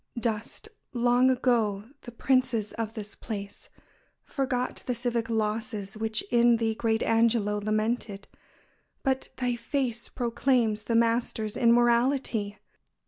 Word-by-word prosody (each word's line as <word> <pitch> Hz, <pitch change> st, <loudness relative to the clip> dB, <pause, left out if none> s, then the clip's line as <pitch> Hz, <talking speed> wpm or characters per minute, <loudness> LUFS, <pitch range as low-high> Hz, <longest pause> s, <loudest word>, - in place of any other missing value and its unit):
Dust, 225 Hz, -, -3 dB, 0.3 s
long 245 Hz, +1 st, +3 dB
ago, 225 Hz, -5 st, +1 dB
the 240 Hz, -, -9 dB
princes 245 Hz, -3 st, +1 dB
of 225 Hz, 0 st, -4 dB
this 210 Hz, -2 st, -7 dB
place; 205 Hz, -3 st, -7 dB, 0.5 s
Forgot 255 Hz, -3 st, -2 dB
the 250 Hz, -, 0 dB
civic 235 Hz, -1 st, -1 dB
losses 215 Hz, -2 st, -2 dB
which 220 Hz, 0 st, -1 dB
in 240 Hz, -1 st, +5 dB
thee 225 Hz, -1 st, 0 dB
Great 220 Hz, 0 st, 0 dB
Angelo 225 Hz, -2 st, +2 dB
lamented; 215 Hz, -1 st, -2 dB, 0.8 s
but 265 Hz, -1 st, 0 dB
thy 250 Hz, -1 st, 0 dB
face 240 Hz, -1 st, -2 dB
Proclaims 235 Hz, -3 st, 0 dB
the 230 Hz, -, 0 dB
master's 230 Hz, -2 st, +1 dB
immortality! 235 Hz, -2 st, +2 dB
230 Hz, 115 wpm, -27 LUFS, 215-245 Hz, 0.8 s, in